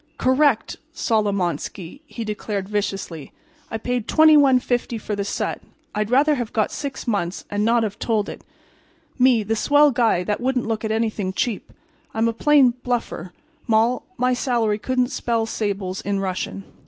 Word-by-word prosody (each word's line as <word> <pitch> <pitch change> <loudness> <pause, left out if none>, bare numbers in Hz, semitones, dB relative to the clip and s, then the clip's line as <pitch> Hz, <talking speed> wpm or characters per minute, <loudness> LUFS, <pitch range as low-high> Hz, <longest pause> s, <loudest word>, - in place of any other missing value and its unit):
"Correct, 260 -2 +2 0.2
Solomonski!" 200 - -1
he 230 - -6
declared, 210 -2 -4
viciously. 195 -7 -4 0.4
"I 225 - -3
paid 245 0 -2
$21.50 265 -6 +4
for 210 0 -4
the 200 - -2
set. 200 - -3 0.3
I'd 210 0 -1
rather 285 +5 +4
have 240 -6 -3
got 215 -2 0
six 280 -2 -5
months 200 -6 -2
and 205 0 0
not 230 +1 +3
have 205 -2 -4
told 215 -3 0
it. - - -8 0.8
Me, 250 -3 +4
the 220 +2 -1
swell 290 +5 +4
guy 230 -8 +2
that 210 +4 -2
wouldn't 255 -1 0
look 225 -1 -2
at 220 - -1
anything 220 -4 -1
cheap! 225 +1 -2 0.4
I'm 225 +1 +2
a 230 - 0
plain 275 +1 +5
bluffer. 235 -8 -3 0.4
Moll—my 240 +2 +1
salary 235 -4 0
couldn't 250 +2 0
spell 230 -4 -1
sables 200 -4 -3
in 200 0 -1
Russian." 195 +1 -3
225 Hz, 155 wpm, -22 LUFS, 205-250 Hz, 0.8 s, plain